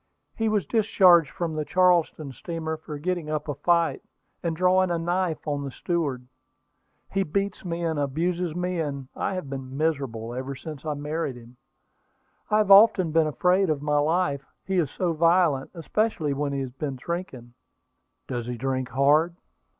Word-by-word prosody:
"He 225 -1 0
was 210 -3 +1
discharged 185 - +5
from 170 -2 -3
the 155 0 -2
Charleston 170 -3 +2
steamer 160 +4 -4
for 155 -1 -8
getting 170 0 -2
up 155 0 -2
a 145 - -1
fight, 170 +4 +1 0.4
and 165 -2 -2
drawing 185 +2 +3
a 170 - 0
knife 175 -1 -1
on 145 -1 -1
the 140 - -4
steward. 140 -4 -2 0.9
He 195 - +1
beats 195 +4 -2
me 170 -1 -3
and 160 -3 -1
abuses 165 +4 -1
me, 180 0 -2
and 140 -4 -4
I - - -2
have 185 -6 -4
been 135 -1 -6
miserable 135 -7 -2
ever 130 +2 -4
since 155 +2 -8
I 150 - -1
married 150 -1 -3
him. 120 +1 -14 0.9
I 210 - +3
have 210 -2 +2
often 195 -4 +7
been 160 0 +3
afraid 180 +4 +2
of 150 -2 -1
my 150 0 +2
life, 150 -2 +1 0.2
he 190 -1 +1
is 155 -6 +1
so 175 +3 -1
violent, 165 -4 +3
especially 165 -3 -1
when 145 +1 -2
he 140 -1 -2
has 130 -2 -5
been 135 +1 -4
drinking." 130 -5 -6 0.7
"Does 120 -2 -4
he 125 -1 -4
drink 130 +1 -2
hard?" 145 +7 +3
160 Hz, 175 wpm, -25 LUFS, 140-180 Hz, 0.9 s, often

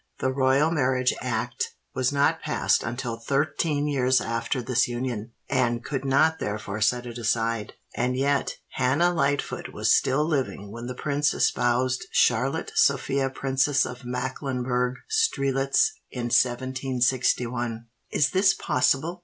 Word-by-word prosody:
The 130 - 0
Royal 135 +4 +2
Marriage 130 -4 +1
Act 120 0 -3 0.2
was 130 0 0
not 140 0 +2
passed - - +1
until 120 -1 -4
thirteen 145 +4 0
years 130 -3 +2
after 115 +3 -2
this 125 0 +1
union, 120 -2 -4
and 120 -3 0
could 135 -2 -3
not 155 +4 +3
therefore 105 0 -4
set 120 +3 +2
it 120 0 -7
aside; 115 -1 -1 0.2
and 125 +1 0
yet 140 +1 0
Hannah 140 +8 +2
Lightfoot 145 -3 -1
was - - +3
still 140 +3 +2
living 130 - -2
when 115 +2 -7
the 125 - -5
prince 145 +2 0
espoused 125 +1 +1
Charlotte - - +1
Sophia 135 -1 +2
Princess 135 +1 +1
of 125 +1 -8
Mecklenburgh 125 0 -2
Strelitz 140 - +2 0.2
in 120 -2 -4
1761." 125 -2 0 0.2
"Is 150 +1 +2
this 190 +1 +4
possible?" 160 +2 0
130 Hz, 130 wpm, -25 LUFS, 120-140 Hz, 0.2 s, this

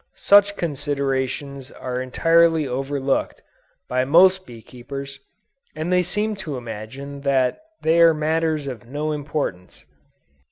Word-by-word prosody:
Such 205 0 +4
considerations 140 -2 -3
are 125 -2 -5
entirely 165 +4 +3
overlooked, 135 +1 -2 0.4
by 130 0 0
most 185 +7 +4
bee 115 -2 -12
keepers, 135 +3 -8 0.6
and 160 +4 -2
they 180 - +4
seem 210 +4 -2
to 160 -8 -5
imagine 125 +5 -8
that 135 -2 +1 0.2
they 165 +1 +4
are 165 0 +8
matters 155 -1 0
of 125 -3 -7
no 150 +4 -3
importance. 145 - -4
140 Hz, 120 wpm, -22 LUFS, 130-165 Hz, 0.6 s, are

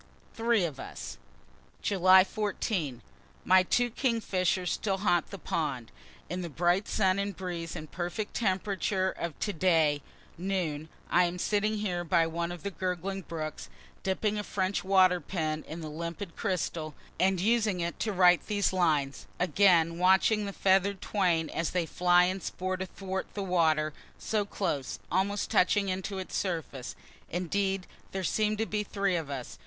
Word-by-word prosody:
THREE 230 -4 +2
OF 145 -5 -5
US - - -7 0.7
July 185 -1 +6
14. 190 - -2 0.4
My 185 0 +6
two 240 +6 +1
kingfishers 190 -8 0
still 195 -3 -1
haunt 175 -4 +1
the 200 - -7
pond. 140 -9 -3 0.4
In 180 +2 -3
the 170 - -4
bright 175 +6 +1
sun 190 -2 +2
and 200 0 -2
breeze 175 -3 -4
and 155 - -8
perfect 175 +5 -4
temperature 190 -2 0
of 170 -3 -5
to 205 - -1
day, 160 -4 +3 0.4
noon, 170 -5 -2 0.2
I 180 +1 +5
am 175 +1 -3
sitting 210 +3 +1
here 180 -4 -2
by 165 0 +3
one 170 +1 -2
of 175 -2 -8
the 200 - -3
gurgling 185 +1 -3
brooks, 155 -3 -6 0.3
dipping 210 +2 0
a - - -2
French 190 -1 -1
water 185 -1 +5
pen 155 -1 -2
in 165 +2 -6
the 155 - -5
limpid 170 +4 -6
crystal, 170 -7 -2 0.2
and 190 0 +3
using 215 -1 +2
it 170 0 -3
to 215 - 0
write 180 -2 +4
these 205 -2 +1
lines, 150 -7 +1
again 175 -3 +4
watching 190 +3 +4
the - - -3
feather'd 195 0 +2
twain, 175 -6 +1
as 165 - -2
they 180 -2 0
fly 175 +1 +4
and 185 +1 0
sport 185 +1 -3
athwart 190 0 -4
the 200 - -2
water, 160 -4 +2 0.2
so 210 -2 -1
close, 170 -10 -2
almost 200 +2 0
touching 200 +2 +3
into 190 +1 -3
its 190 - -5
surface. 160 -9 -3 0.3
Indeed 190 +2 -1 0.3
there 190 -1 -2
seem 215 +3 +1
to 225 - 0
be 210 -1 -1
three 200 -2 0
of 160 -4 -3
us. 125 - -6
185 Hz, 160 wpm, -29 LUFS, 170-200 Hz, 0.7 s, July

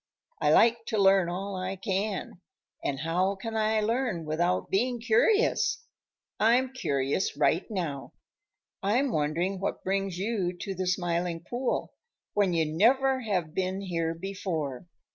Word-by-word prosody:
"I - - +4
like 230 0 +4
to 220 - -1
learn 195 -3 +5
all 195 +3 -4
I 185 +1 -3
can, 195 -1 -3 0.4
and 135 -1 -2
how 180 +5 +1
can 225 +3 -6
I 220 0 +2
learn 220 -6 -1
without 175 +4 0
being 240 +5 +1
curious? 400 - +2 0.6
I'm 250 +4 +3
curious 140 - -1
right 160 +6 +2
now. 165 -10 -4 0.7
I'm 240 +7 +1
wondering 170 +4 0
what 195 - -3
brings 195 -1 -1
you 190 -3 -1
to 195 +2 -4
the 185 0 -3
Smiling 175 -2 -1
Pool 245 +1 -2 0.4
when 200 -3 +2
you 165 -1 +2
never 260 - +3
have 185 -9 -2
been 185 +1 -1
here 165 -3 -2
before. 170 -6 -4
190 Hz, 140 wpm, -28 LUFS, 170-220 Hz, 0.7 s, learn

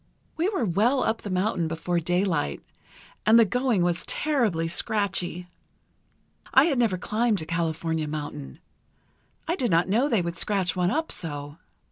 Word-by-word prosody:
"We 335 +4 +1
were 380 - -1
well 220 +9 +2
up 225 - -1
the 205 - -6
mountain 185 -2 0
before 170 +2 -1
daylight, 175 - -1 0.6
and 220 +2 +6
the 230 - +7
going 245 -4 +1
was 175 0 0
terribly 230 - 0
scratchy. 185 -2 -2 1.0
I 265 - +7
had 285 -7 +1
never 220 -6 +2
climbed 215 0 0
a - - -8
California 160 -1 -2
mountain. 150 -1 -6 0.9
I 335 - +1
did 250 -8 -1
not 170 +1 +2
know 240 +8 +2
they 220 -9 +2
would 170 0 -4
scratch 190 -5 +1
one 180 -1 +1
up 320 +9 -1
so. 145 -2 -5
185 Hz, 155 wpm, -26 LUFS, 165-230 Hz, 1.0 s, the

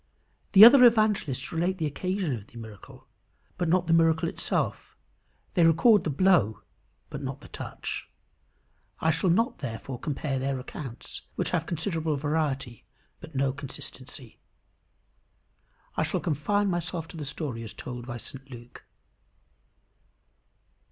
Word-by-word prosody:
The 205 +2 +12
other 250 +2 +9
evangelists 215 - +3
relate 175 +3 0
the 160 - -1
occasion 180 0 -2
of 105 -2 -10
the 120 - -14
miracle, 110 -3 -11 0.5
but 175 -2 0
not 180 +1 +3
the 165 - +2
miracle 165 -1 +4
itself; - - -2 0.6
they 175 - +3
record 170 +5 +5
the - - 0
blow, 145 - +3 0.5
but - - -5
not - - -5
the - - -12
touch. - - -6 0.9
I 160 - +2
shall 165 +4 0
not, 230 +9 +2
therefore, 125 0 -6
compare 145 -2 -2
their 135 0 -1
accounts, 125 -1 -7
which - - -1
have 165 -2 0
considerable 160 -2 -1
variety, 140 -5 -2 0.4
but 155 - -12
no 135 0 +2
inconsistency. 135 -2 -9 1.6
I - - 0
shall - - 0
confine 190 +6 0
myself 175 -2 -2
to 170 - -10
the 155 - -5
story 140 -4 -4
as 110 -2 -7
told 125 -1 -7
by 120 -1 -5
St 135 +3 -11
Luke. 120 -1 -12
155 Hz, 140 wpm, -27 LUFS, 130-175 Hz, 1.6 s, The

